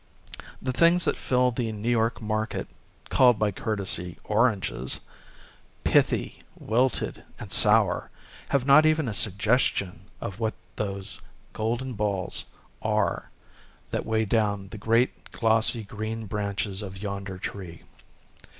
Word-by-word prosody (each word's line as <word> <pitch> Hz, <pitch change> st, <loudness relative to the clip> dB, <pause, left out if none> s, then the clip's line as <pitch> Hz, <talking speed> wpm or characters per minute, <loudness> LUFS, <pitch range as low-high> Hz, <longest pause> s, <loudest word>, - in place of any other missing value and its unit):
The 130 Hz, -1 st, -2 dB
things 170 Hz, +5 st, +4 dB
that -, -, +1 dB
fill 125 Hz, -1 st, +2 dB
the 115 Hz, -1 st, -2 dB
New 110 Hz, +3 st, -2 dB
York 115 Hz, 0 st, +1 dB
market, 110 Hz, +1 st, -2 dB, 0.4 s
called 125 Hz, -3 st, +5 dB
by 105 Hz, -1 st, +1 dB
courtesy 95 Hz, -4 st, -1 dB
" -, -, -30 dB
oranges," 105 Hz, -, +1 dB, 0.4 s
— -, -, -29 dB
pithy, -, -, +2 dB, 0.2 s
wilted, 125 Hz, +3 st, 0 dB
and -, -, -8 dB
sour, -, -, +4 dB, 0.2 s
— -, -, -20 dB
have 135 Hz, -2 st, +1 dB
not 140 Hz, +3 st, +7 dB
even 155 Hz, -3 st, +2 dB
a 110 Hz, -, -2 dB
suggestion 105 Hz, -1 st, 0 dB
of 95 Hz, +1 st, -6 dB
what 110 Hz, -1 st, -1 dB, 0.2 s
those 100 Hz, -2 st, -3 dB, 0.3 s
golden 120 Hz, +4 st, -2 dB
balls 100 Hz, -3 st, -1 dB, 0.4 s
are -, -, 0 dB, 0.6 s
that -, -, -1 dB
weigh 110 Hz, 0 st, 0 dB
down 105 Hz, -2 st, 0 dB
the 110 Hz, -, -8 dB
great 115 Hz, +4 st, +1 dB
glossy 115 Hz, 0 st, +2 dB
green 110 Hz, +2 st, -5 dB
branches 100 Hz, -1 st, -2 dB
of 95 Hz, -2 st, -7 dB
yonder 100 Hz, -1 st, -5 dB
tree. 90 Hz, -3 st, -7 dB
110 Hz, 130 wpm, -26 LUFS, 100-120 Hz, 0.6 s, not